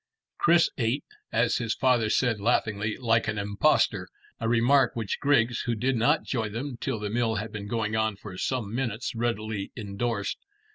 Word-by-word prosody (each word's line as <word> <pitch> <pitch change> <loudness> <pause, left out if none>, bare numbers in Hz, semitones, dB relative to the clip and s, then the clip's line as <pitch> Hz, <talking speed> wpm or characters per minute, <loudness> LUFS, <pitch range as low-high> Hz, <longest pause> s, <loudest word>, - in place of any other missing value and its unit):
Chris 170 0 +4
ate, 120 +4 0 0.3
as - - +2
his 115 -3 -1
father 120 -4 +2
said 115 -2 +1
laughingly, 105 -1 0
like 115 -2 +2
an 110 -1 -1
impostor, 100 +9 +2 0.3
a - - -1
remark 120 +4 +4
which 110 -4 -3
Griggs, 125 -5 +2
who 120 - +1
did 130 +4 0
not 145 +7 +3
join 110 -5 -2
them 130 +3 -4
till - - -1
the 105 0 -4
meal 115 -1 +1
had 105 +1 -4
been 105 -1 -6
going 110 -1 -1
on 110 -1 +1
for 100 -1 -10
some 110 0 -2
minutes, 120 -2 -2
readily 110 -3 -2
endorsed. 100 0 -2
115 Hz, 175 wpm, -27 LUFS, 105-125 Hz, 0.3 s, Chris